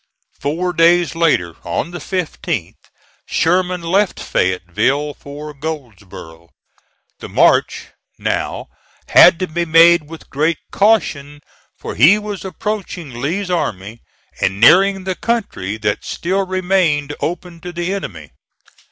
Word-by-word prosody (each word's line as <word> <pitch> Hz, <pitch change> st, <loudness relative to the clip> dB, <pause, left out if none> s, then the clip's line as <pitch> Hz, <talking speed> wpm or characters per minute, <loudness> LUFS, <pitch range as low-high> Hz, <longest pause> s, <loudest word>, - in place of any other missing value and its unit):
Four 175 Hz, +5 st, -2 dB
days 170 Hz, 0 st, +3 dB
later, 150 Hz, -, +1 dB
on 85 Hz, -, -3 dB
the 175 Hz, -, -6 dB
15th, 180 Hz, 0 st, -4 dB, 0.5 s
Sherman 180 Hz, +1 st, 0 dB
left 190 Hz, +4 st, +1 dB
Fayetteville 105 Hz, -, -1 dB
for 150 Hz, +2 st, -9 dB
Goldsboro. 100 Hz, -, -8 dB, 0.7 s
The -, -, -9 dB
march, -, -, +2 dB, 0.3 s
now, -, -, -3 dB, 0.4 s
had -, -, +7 dB
to 185 Hz, -, -2 dB
be 170 Hz, +1 st, -2 dB
made 165 Hz, -1 st, +5 dB
with 165 Hz, -1 st, -12 dB
great 155 Hz, +3 st, 0 dB
caution, 145 Hz, -9 st, +1 dB, 0.4 s
for -, -, -7 dB
he 160 Hz, -, +6 dB
was 210 Hz, -2 st, -6 dB
approaching 185 Hz, -, -5 dB
Lee's 180 Hz, +7 st, -2 dB
army 110 Hz, -, -3 dB, 0.4 s
and 95 Hz, +1 st, 0 dB
nearing 190 Hz, -, +5 dB
the 190 Hz, 0 st, -2 dB
country 180 Hz, -, -3 dB
that 105 Hz, -1 st, -2 dB
still 190 Hz, +2 st, -2 dB
remained 180 Hz, -6 st, 0 dB
open 175 Hz, 0 st, -4 dB
to 180 Hz, -, -7 dB
the 175 Hz, +2 st, -3 dB
enemy. 80 Hz, -, -7 dB
165 Hz, 120 wpm, -17 LUFS, 140-185 Hz, 0.7 s, had